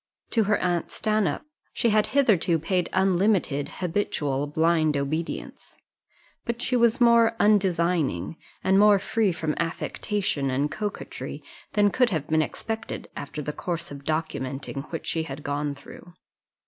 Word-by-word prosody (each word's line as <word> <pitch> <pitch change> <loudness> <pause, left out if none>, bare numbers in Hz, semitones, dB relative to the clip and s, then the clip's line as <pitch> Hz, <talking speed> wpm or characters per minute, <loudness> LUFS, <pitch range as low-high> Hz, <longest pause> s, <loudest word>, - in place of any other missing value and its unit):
To 225 -3 +3
her 205 +1 +3
aunt 175 -2 -1
Stanhope 215 -7 0 0.3
she 230 - +1
had 215 0 +3
hitherto 195 - +4
paid 180 +2 -1
unlimited, 190 -6 +2
habitual, 145 -6 -1
blind 155 0 +2
obedience; 155 +4 -4 0.7
but 235 0 -3
she 250 - 0
was 235 +1 +3
more 235 -1 +5
undesigning, 170 - +2 0.3
and 190 +1 +4
more 210 0 +7
free 210 +1 +1
from 160 -2 -2
affectation 165 -2 -1
and 140 +3 0
coquetry, 210 -1 -5 0.3
than 205 -1 +4
could 250 +2 +3
have 160 -8 -2
been 155 0 +3
expected, 220 +7 -5
after 150 +1 -6
the 150 - -3
course 170 -2 -4
of 140 0 -8
documenting 140 -2 -3
which 165 - -4
she 165 - -1
had 145 -2 -7
gone 145 0 -2
through. 175 +4 -13
170 Hz, 140 wpm, -26 LUFS, 150-210 Hz, 0.7 s, more